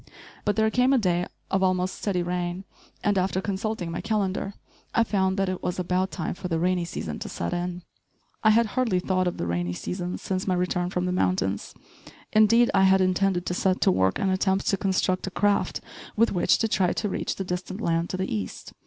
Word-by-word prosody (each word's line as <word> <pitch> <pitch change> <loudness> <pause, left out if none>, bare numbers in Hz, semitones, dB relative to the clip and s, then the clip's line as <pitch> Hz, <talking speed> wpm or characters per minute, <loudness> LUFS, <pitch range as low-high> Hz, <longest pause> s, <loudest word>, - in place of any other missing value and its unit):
But 205 - +2
there 220 0 +2
came 250 +3 +3
a - - +5
day 180 -5 +1 0.2
of 195 - +2
almost 185 0 +1
steady 185 -4 -1
rain, 175 +1 -2 0.4
and, 205 -2 +2
after 185 0 0
consulting 195 -2 -3
my 170 - -3
calendar, 200 -2 -1 0.4
I 230 - +5
found 190 -3 0
that 195 0 +1
it 185 -1 -3
was 180 0 -2
about 185 +1 0
time 175 -4 -3
for 180 - -6
the 165 -2 0
rainy 180 +1 +1
season 80 - -5
to - - -6
set 85 - -3
in. 175 0 -3 0.6
I 215 - +6
had 230 +2 +5
hardly 240 -8 +1
thought 185 0 0
of 175 - -2
the - - -2
rainy 85 +1 -1
season 180 - -4
since 185 0 -3
my 185 - +2
return 180 0 0
from 180 -1 -1
the 180 - 0
mountains. 95 - 0 0.6
Indeed, 230 +3 +5
I 190 -1 +5
had 190 0 +5
intended 185 -1 +1
to - - -1
set 185 +1 +1
to - - +5
work 95 +1 +2
and 195 - +1
attempt 190 0 +1
to - - +3
construct 190 -1 0
a - - -1
craft 205 +2 +1 0.3
with 230 +2 +3
which 180 - +3
to 225 - +1
try 190 -4 +2
to 215 - -1
reach - - -2
the 195 - -3
distant 185 +2 -4
land 170 -4 0
to 185 - -3
the 190 -8 -2
east. 100 -3 -6
185 Hz, 215 wpm, -26 LUFS, 180-195 Hz, 0.6 s, I